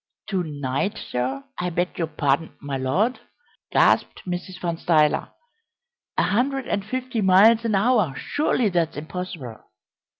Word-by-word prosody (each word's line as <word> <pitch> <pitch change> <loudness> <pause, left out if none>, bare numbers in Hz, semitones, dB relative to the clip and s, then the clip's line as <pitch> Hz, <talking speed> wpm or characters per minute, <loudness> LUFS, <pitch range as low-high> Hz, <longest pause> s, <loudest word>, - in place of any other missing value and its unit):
"To 190 -3 0
night, 145 +5 -2
sir 130 +2 -3 0.2
I 180 - -1
beg 175 +2 -2
your 165 - 0
pardon, 150 0 0
my 140 -1 -4
Lord!" 165 - 0 0.5
gasped - - +3
Mrs. 180 0 -5
Van 170 -2 -2
Stuyler. 155 -3 +2 0.9
"A - - +4
hundred 265 +4 0
and 200 - -1
fifty 255 +1 -3
miles 205 +4 +6
an 220 -3 +1
hour! 205 - +2
Surely 255 -6 0
that's 170 -4 0
impossible." 155 -7 -6
180 Hz, 135 wpm, -24 LUFS, 150-215 Hz, 0.9 s, miles